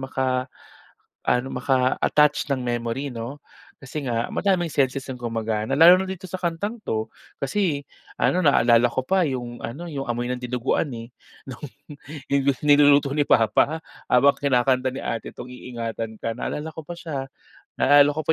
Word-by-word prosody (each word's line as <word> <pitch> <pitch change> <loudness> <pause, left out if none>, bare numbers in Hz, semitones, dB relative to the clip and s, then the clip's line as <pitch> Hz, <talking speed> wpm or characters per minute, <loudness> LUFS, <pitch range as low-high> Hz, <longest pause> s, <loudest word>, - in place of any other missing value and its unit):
maka-ano, 130 -1 -3 0.8
maka-attached 140 +3 +2
ng 130 -2 -1
memory 120 +3 -2
'no? 120 +6 -6 0.4
Kasi 140 +1 -6
nga, 115 -1 -1
madaming 185 -4 0
senses 135 -2 0
ang 130 - -5
gumagana 115 -2 -2
lalo 170 +4 +8
na 190 - -2
dito 185 0 -7
sa 185 - -4
kantang 185 +6 -3
'to, 110 0 -2 0.3
kasi, 145 0 0 0.4
ano 180 -2 +2
na-aalala 120 -4 +5
ko 120 - -2
pa 185 +7 +1
'yong 120 -4 -4
ano 165 +9 -7
'yong 135 -3 -4
amoy 120 0 -2
ng 125 - -2
dinuguan, 125 +4 -1
eh, 115 +1 -8 0.4
no'ng 130 +3 -7 0.6
'yong 140 -1 +1
niluluto 145 -1 +5
ni 145 0 +1
papa 145 +8 +3 0.2
habang 140 +3 +4
kinakanta 130 -1 +1
ni 135 - -6
ate 115 -1 -4
'tong 125 +1 -9
Iingatan 115 -3 -6
Ka, 115 +1 -3
na-aalala 150 +4 -4
ko 160 -1 -10
pa 175 - -6
siya, 155 -6 -5 0.5
na-alala 145 +1 +5
ko 155 - -1
pa 160 - +3
135 Hz, 155 wpm, -23 LUFS, 120-150 Hz, 0.8 s, lalo